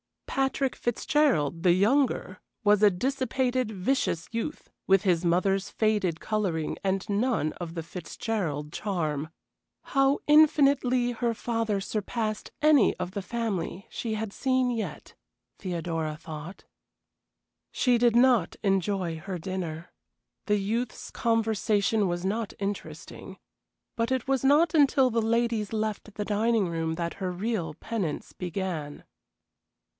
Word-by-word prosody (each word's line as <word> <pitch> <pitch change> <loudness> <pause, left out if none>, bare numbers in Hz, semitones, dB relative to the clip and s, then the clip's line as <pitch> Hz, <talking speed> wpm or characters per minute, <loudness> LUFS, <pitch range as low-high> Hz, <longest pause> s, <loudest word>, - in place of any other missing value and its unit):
Patrick 270 0 0
Fitzgerald, 240 - +1
the 180 -1 +5
younger, 245 +9 +1 0.2
was 205 -1 +4
a 210 - +7
dissipated, 255 +3 -1
vicious 190 -4 -1
youth, 230 +7 -4 0.2
with 195 0 +4
his 180 -3 +2
mother's 185 +3 +1
faded 210 -7 0
coloring 190 -8 -1
and 195 0 -1
none 210 - +1
of 170 -1 -6
the 165 - -3
Fitzgerald 165 -3 -4
charm. 155 -8 -2 0.5
How 275 0 +2
infinitely 280 -5 +4
her 235 0 -1
father 225 -3 -1
surpassed 215 +1 -3
any 300 -6 +5
of 180 - -4
the 200 - -4
family 200 -3 -3
she 225 -2 -3
had 215 -2 -4
seen 260 -2 +1
yet, 225 -3 -5 0.5
Theodora 165 -4 -3
thought. 155 +3 -9 1.1
She 245 -3 +2
did 235 -1 +4
not 240 -7 +4
enjoy 195 -4 0
her 185 +3 -5
dinner. 170 -2 -5 0.6
The 210 0 +3
youth's 225 +5 -3
conversation 220 -2 +1
was 175 +1 -2
not 215 +2 -2
interesting. 200 0 -6 0.6
But 230 +2 -1
it 260 -2 0
was 270 -2 +1
not 305 +4 +5
until 275 -4 +4
the 230 0 +1
ladies 225 -1 0
left 215 -1 -3
the 210 - -3
dining 215 -2 +1
room 165 -1 -2
that 170 0 -3
her 185 -2 -3
real 180 -4 -2
penance 200 -8 -4
began. 175 -5 -4
210 Hz, 125 wpm, -27 LUFS, 180-240 Hz, 1.1 s, a